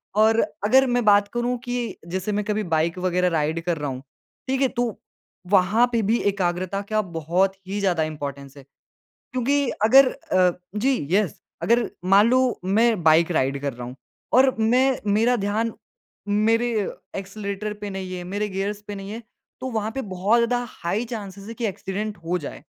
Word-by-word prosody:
और 220 +1 +4 0.3
अगर 265 +5 +5
मैं 245 -1 +1
बात 205 -1 +5
करूँ 240 +1 0
कि 245 -1 -3
जैसे 185 +4 -3
मैं 205 0 0
कभी 210 0 -1
बाइक 165 +2 +1
वग़ैरह 180 0 +1
राइड 155 +2 -1
कर 170 -2 0
रहा 145 -1 -3
हूँ, 130 0 -5 0.5
ठीक 265 +1 0
है 270 - +5
तो, 240 -3 -2 0.5
वहाँ 200 +5 +5
पे 230 -1 +1
भी 220 +3 +2
एकाग्रता 185 +1 -2
क्या 215 +1 0
बहुत 180 +2 0
ही 200 +2 -3
ज़्यादा 180 -5 +1
इम्पोर्टेंस 140 -2 -6
है। 140 - -12 0.5
क्योंकि 275 +2 -1 0.2
अगर 260 +3 +7
अ, 180 -1 +1 0.2
जी, 260 +5 +2 0.2
येस। 195 -5 +1 0.2
अगर 235 0 +2 0.2
मान 205 +4 +6
लो 255 -1 +2
मैं 215 0 +2
बाइक 160 +2 +5
राइड 135 -2 +1
कर 140 -3 -2
रहा 120 0 -7
हूँ 125 - -8 0.4
और 260 +1 +5
मैं 255 +4 +3
मेरा 235 +4 +3
ध्यान 215 +3 -1 0.6
मेरे 225 +4 +2 0.5
एक्सेलरेटर 200 +1 -4
पे 205 - -4
नहीं 190 -1 -5
है, 180 - -6
मेरे 205 +4 -2
गियर्स 200 +2 -3
पे 205 - -5
नहीं 195 +1 -7
है 230 +2 -6 0.4
तो 260 - -3
वहाँ 220 -1 -2
पे 270 - -1
बहुत 200 +3 +1
ज़्यादा 245 +1 +1
हाई 200 +7 -3
चांसेस 200 -4 -7
हैं 230 - -7
कि 235 - -3
एक्सीडेंट 205 +1 -4
हो 180 +2 0
जाए। 145 - -8
205 Hz, 180 wpm, -23 LUFS, 180-230 Hz, 0.6 s, अगर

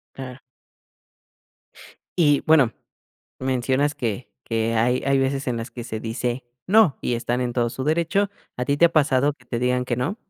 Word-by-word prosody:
Claro. 130 -1 -8 1.8
Y 145 -4 +4
bueno, 140 -8 +5 0.7
mencionas 130 +2 0
que 120 +1 -4
que 115 0 -1
hay 125 +3 +2
hay 135 0 +2
veces 135 +1 0
en 120 - -1
las 115 +2 -5
que 120 -2 -7
se 110 -2 -5
dice: 120 +3 -3 0.2
"No", 200 -6 +5
y 125 - -1
están 120 +1 -1
en 125 -1 -1
todo 120 -1 0
su 130 +2 -5
derecho, 170 +6 +1 0.3
¿a 125 - -2
ti 140 +2 +1
te 170 - +4
ha 165 - -3
pasado 145 -2 +3
que 130 -3 -23
te 120 - -3
digan 125 0 +1
que 120 -2 -2
no? 140 - -2
130 Hz, 180 wpm, -23 LUFS, 120-145 Hz, 1.8 s, bueno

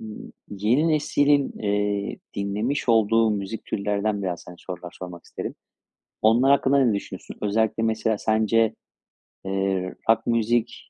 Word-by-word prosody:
ımm, 110 -1 -9 0.2
yeni 110 +11 +2
neslin, 145 -2 +2
eee, 105 -1 -1 0.2
dinlemiş 105 +8 -2
olduğu 115 0 +4
müzik 105 +2 -4
türlerinden, 100 0 -1
biraz, 90 -3 -3
hani, 90 - -10
sorular 90 -1 -8
sormak 90 -2 -8
isterim. - - -6 0.7
Onlar 120 +5 +5
hakkında 140 0 +4
ne 115 - +3
düşünüyorsun? 100 - -6
Özellikle, 110 +2 +1
mesela, 110 -1 0
sence, 110 0 +2 0.7
eee, 95 -1 -1
rock 115 - +3
müzik 115 0 0
110 Hz, 125 wpm, -24 LUFS, 100-115 Hz, 0.7 s, Onlar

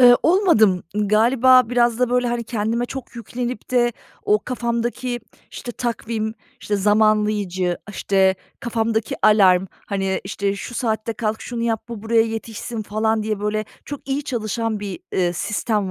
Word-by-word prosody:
Iıı, 245 -1 +9
olmadım. 310 - +4
Iıı, 210 -1 0
galiba 250 +3 +5
biraz 240 -1 +2
da, 250 -1 +2
böyle, 250 0 +2
hani, 235 0 -2
kendime 230 +1 -1
çok 260 -2 -8
yüklenip 240 +1 -5
de 240 -1 +3 0.3
o 420 +1 +4
kafamdaki, 240 0 -2 0.3
işte 240 - -7
takvim, 225 -2 -3 0.3
işte, 205 - -1
zamanlayıcı, 210 -3 +2
işte, 190 -1 +2 0.3
kafamdaki 225 -2 -1
alarm, 190 -3 +5 0.2
hani, 195 -1 -1
işte, 200 0 -2
şu 240 - -7
saatte 225 -1 -1
kalk, 220 0 -2
şunu 235 -2 -4
yap, 225 -2 0
bu 230 -3 -7
buraya 225 0 +4
yetişsin 225 0 -4
falan 220 +1 0
diye 215 -1 -2
böyle 210 +1 -1 0.2
çok 285 -1 -8
iyi 275 +1 -1
çalışan 225 -2 -2
bir, 205 - -5
ııı, 175 -2 +2
sistem 210 +2 -1
225 Hz, 150 wpm, -21 LUFS, 210-240 Hz, 0.3 s, Iıı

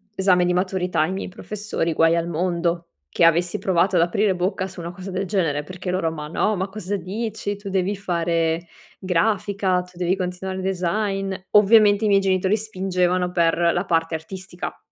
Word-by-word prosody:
esame 185 -2 +3
di 180 - +1
maturità, 180 -3 0
i 170 - -3
miei 190 - -4
professori, 195 -4 -3
guai 165 +1 +4
al 170 0 -1
mondo 170 0 -1 0.2
che - - 0
avessi 170 +1 +3
provato 185 0 +2
ad 170 - +5
aprire 190 +3 +2
bocca 185 +1 -1
su 190 -1 -11
una 170 - -5
cosa 185 +1 -9
del 190 +1 -2
genere, 165 -7 0
perché 185 +3 -7
loro: 180 -3 0
“Ma 150 -2 -6
no, 210 +7 0
ma 190 +2 -1
cosa 200 0 -4
dici? 205 +3 -4
Tu 200 0 -8
devi 190 +1 0
fare 170 -3 -1 0.3
grafica, 190 0 +1
tu 180 -1 -18
devi 180 +1 +1
continuare 185 +1 -4
design." 195 +1 -1 0.2
Ovviamente 210 0 +6
i - - +3
miei 200 -1 +5
genitori 190 +1 +1
spingevano 185 -4 0
per 170 -2 +2 0.2
la 175 +2 -1
parte 165 -2 0
artistica. 180 +2 -7
185 Hz, 175 wpm, -22 LUFS, 170-195 Hz, 0.3 s, Ovviamente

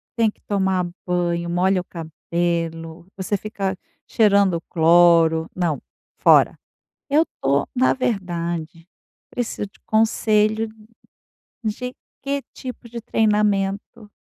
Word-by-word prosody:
tem 225 -3 +2
que - - -35
tomar 190 -3 0 0.2
banho, 175 -1 -1
molha 185 +1 +2
o - - -11
cabelo, 165 0 -3
você 190 +2 -1
fica 195 -2 -3 0.3
cheirando 200 -5 +3
cloro, 165 -1 +4
não, 170 -5 -1 0.4
fora. - - +5 0.5
Eu 300 +2 +4
estou 140 - -1
na 255 0 +3
verdade, 170 -7 -3 0.4
preciso 235 -3 -3
de - - -26
conselho 220 0 +2 1.0
de 250 +4 -3 0.3
que 280 0 -2
tipo 250 -2 -8
de 235 0 -6
treinamento 210 -1 0
190 Hz, 105 wpm, -22 LUFS, 170-215 Hz, 1.0 s, fora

